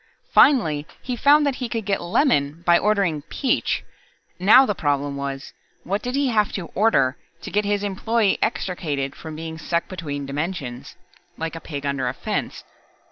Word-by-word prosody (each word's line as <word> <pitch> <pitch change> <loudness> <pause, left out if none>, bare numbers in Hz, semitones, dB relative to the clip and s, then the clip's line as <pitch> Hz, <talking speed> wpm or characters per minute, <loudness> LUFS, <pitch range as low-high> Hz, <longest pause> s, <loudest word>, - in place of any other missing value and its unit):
Finally 160 - +4 0.2
he 250 - -3
found 290 +4 +5
that 275 -2 0
he 250 -2 -4
could 225 -3 -3
get 200 -1 0
lemon 170 - +1
by 175 - +6
ordering 195 -6 +1
peach. 265 -4 0 0.6
Now 215 +9 +7
the 205 - 0
problem 145 -4 -1
was, 140 -1 -5 0.3
what 200 +3 -2
did 250 +1 -3
he 280 -1 +2
have 210 -3 +2
to 175 -5 -5
"order" 195 -11 +2 0.3
to - - -6
get 210 +1 +1
his 205 0 0
employer 205 +2 +1
extricated 155 - -2
from 160 -1 -8
being 160 0 -6
stuck 170 +2 -1
between 145 -6 -5
dimensions, 140 -3 -5 0.4
like 165 0 -4
a 165 - -7
pig 145 -3 -6
under 140 -2 -1
a 125 - -2
fence? - - -3
175 Hz, 170 wpm, -23 LUFS, 145-215 Hz, 0.6 s, Now